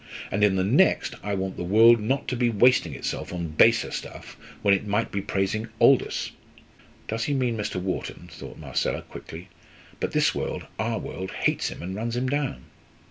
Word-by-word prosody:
And 100 +1 +1
in 100 -2 +4
the 95 - +1
next, 135 - +3
I 100 -1 -2
want 95 0 -3
the - - -3
world 115 +6 +6
not 130 +6 -1
to 125 - -1
be 120 -1 +2
wasting 120 +3 +3
itself - - -4
on 85 -2 -4
baser 115 +10 +4
stuff - - -7 0.3
when 100 - +5
it 100 +2 0
might 105 +3 0
be 100 - -2
praising 100 +3 -1
Aldous!" 130 +2 +3 0.8
"Does 115 +1 -2
he 145 - 0
mean 125 -3 0
Mr. 105 -3 -3
Wharton?" 95 0 -4
thought - - -10
Marcella, - - -2
quickly. 85 +4 -10 0.5
"But - - -2
this - - +3
world - - -4
our 115 +1 0
world 95 0 -6
hates - - 0
him - - -8
and 95 +2 -4
runs 115 +4 -3
him 125 +1 -1
down." 145 0 -2
110 Hz, 190 wpm, -25 LUFS, 95-120 Hz, 0.8 s, world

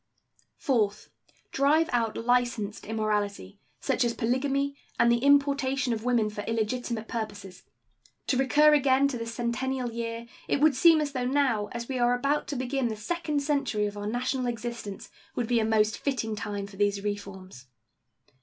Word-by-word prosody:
Fourth. 215 -7 0 0.4
Drive 300 +4 +3
out 230 -2 0
licensed 240 -4 0
immorality, 210 - -2 0.2
such - - 0
as 235 -1 0
polygamy 275 +4 0 0.2
and 235 - +5
the 235 - +3
importation 275 -2 +2
of 220 -1 -4
women 240 -3 +2
for 210 0 -5
illegitimate 225 0 -2
purposes. 205 -5 -6 0.6
To - - +1
recur 295 +4 +5
again 275 -1 +4
to 260 - -3
the 230 - -4
centennial 240 +2 -2
year, 230 0 -4 0.2
it - - +1
would 305 0 +5
seem 320 +3 +6
as 295 -1 -2
though 255 -3 -2
now, 255 -6 +1
as 235 0 -5
we 260 -2 -3
are 245 0 +3
about 280 +4 0
to 285 - -4
begin 255 0 -1
the 220 - -3
second 300 +6 -2
century 275 -8 0
of 205 0 -4
our 205 0 -5
national 250 +3 -1
existence, 235 -3 -5 0.2
would 240 - -1
be 240 -1 +2
a - - +1
most 220 -1 +2
fitting 230 -6 -2
time 205 -1 -4
for 200 -1 -13
these 200 0 +1
reforms. 190 -9 -6
240 Hz, 165 wpm, -27 LUFS, 215-270 Hz, 0.6 s, seem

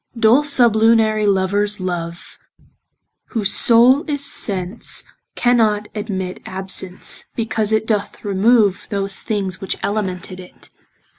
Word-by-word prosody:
Dull 230 +6 +4
sublunary 225 -5 +3
lovers 200 +2 0
love 175 -2 -6 0.9
(Whose 210 -4 -2
soule 245 +5 +5
is 285 -1 -2
sense) 190 -2 -1 0.3
cannot 220 -4 +1
admit 190 -4 -5
Absence, 190 -1 -4
because 220 -2 -1
it 220 0 +1
doth 210 -1 -3
remove 205 0 +2
Those 195 -1 +1
things 195 -4 -3
which 195 - -3
elemented 185 -3 -3
it. 180 -1 -14
210 Hz, 105 wpm, -18 LUFS, 190-225 Hz, 0.9 s, soule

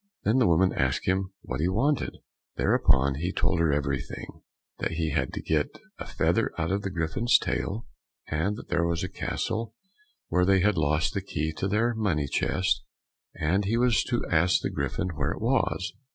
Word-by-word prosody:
Then 115 +5 +3
the 125 - +4
woman 90 +3 +3
asked - - 0
him 95 +1 +1
what 65 - -4
he 85 - +2
wanted? 130 +10 0 0.4
Thereupon 65 +1 +3
he 90 +3 -1
told 85 - +1
her 85 -2 +3
everything;—that 70 +3 -4
he 80 -1 -1
had - - 0
to - - -5
get 75 -2 0 0.2
a - - -6
feather - - +1
out 80 +2 -1
of 100 +1 0
the 100 - -3
Griffin's 90 +7 +2
tail, 110 +4 -3 0.4
and 80 +7 0
that 120 - -10
there 85 - +1
was 85 -1 -1
a - - -1
castle 110 0 -3 0.5
where 90 - +2
they 95 0 +4
had 105 +1 +3
lost 75 0 +1
the - - -1
key 80 +2 -3
of 95 - 0
their 115 +4 +2
money 100 -10 0
chest, 70 -2 0 0.5
and 90 +6 +1
he 110 +4 +1
was 120 -1 +3
to 120 -2 -1
ask 85 +2 +3
the - - -2
Griffin 70 +6 -2
where 75 -1 -1
it - - -8
was? 115 -5 0
90 Hz, 185 wpm, -27 LUFS, 80-105 Hz, 0.5 s, the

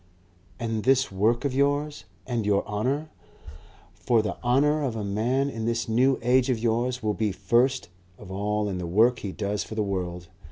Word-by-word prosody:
"And 115 -2 -2
this 135 -1 +3
work 110 +7 +1
of 140 - 0
yours? 145 +2 0 0.2
And 120 -3 -2
your 100 -1 +1
honour? 130 +9 -2 0.8
For 115 -3 +1
the 100 -5 -3
honour 145 +5 +3
of 130 -5 -2
a 110 - -3
man 115 +7 0
in 115 -5 -4
this 115 0 -1
New 125 +4 +3
Age 125 +2 +3
of 125 - +2
yours 120 +2 -1
will 105 -1 +1
be 105 -1 -1
first 125 +4 +1 0.3
of 90 - -11
all 105 +2 -1
in 95 -2 -3
the 90 - -4
work 115 +8 +3
he 100 - -5
does 100 0 -2
for 110 - -8
the 110 - 0
world. 90 -3 -4
115 Hz, 190 wpm, -26 LUFS, 105-130 Hz, 0.8 s, this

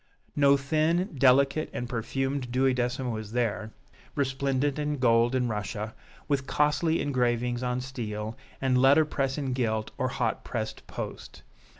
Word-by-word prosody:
No 140 -1 +5
thin, 160 +6 +1
delicate 140 +3 +4
and 120 - -3
perfumed 130 +2 -2
duodecimo 125 -1 +1
is 110 0 -8
there, 110 -3 -1 0.4
resplendent 135 +1 0
in 150 0 -1
gold 120 0 +3
and 125 -1 +1
Russia, 105 0 -3 0.3
with 140 -2 0
costly 150 +2 +2
engravings 120 -2 0
on 125 0 -1
steel, 110 -4 -5 0.2
and 130 -1 +2
letter 140 +4 +6
press 135 -2 -1
in 135 -3 -2
gilt 110 -4 -1
or - - +1
hot - - -1
pressed - - -5
post. - - -7
130 Hz, 135 wpm, -28 LUFS, 120-140 Hz, 0.4 s, letter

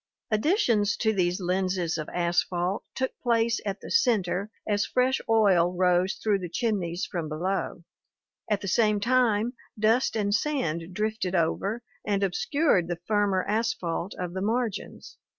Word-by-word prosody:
Additions 215 - +2
to 220 -1 +1
these 180 -1 +1
lenses 180 -2 0
of 155 - -5
asphalt 175 +2 0
took 260 0 -1
place 235 -1 +2
at 195 0 -3
the - - -8
center 205 - +2 0.2
as 205 -1 +1
fresh 255 +3 +1
oil 195 -6 +4
rose 180 +1 +2
through 210 -3 0
the 180 -2 -5
chimneys 180 -4 -1
from 165 -4 -4
below; 175 +2 -2 0.7
at 210 -2 +1
the 195 - -5
same 210 +2 +3
time 235 0 +2 0.2
dust 225 +4 +2
and 205 -2 0
sand 190 - -1
drifted 210 -2 -2
over 195 +7 0 0.2
and 200 -1 0
obscured 195 - +1
the 175 -1 -3
firmer 205 -3 +1
asphalt 205 -5 -2
of 180 -1 -4
the 190 - -3
margins. 225 +1 -3
200 Hz, 145 wpm, -27 LUFS, 180-225 Hz, 0.7 s, oil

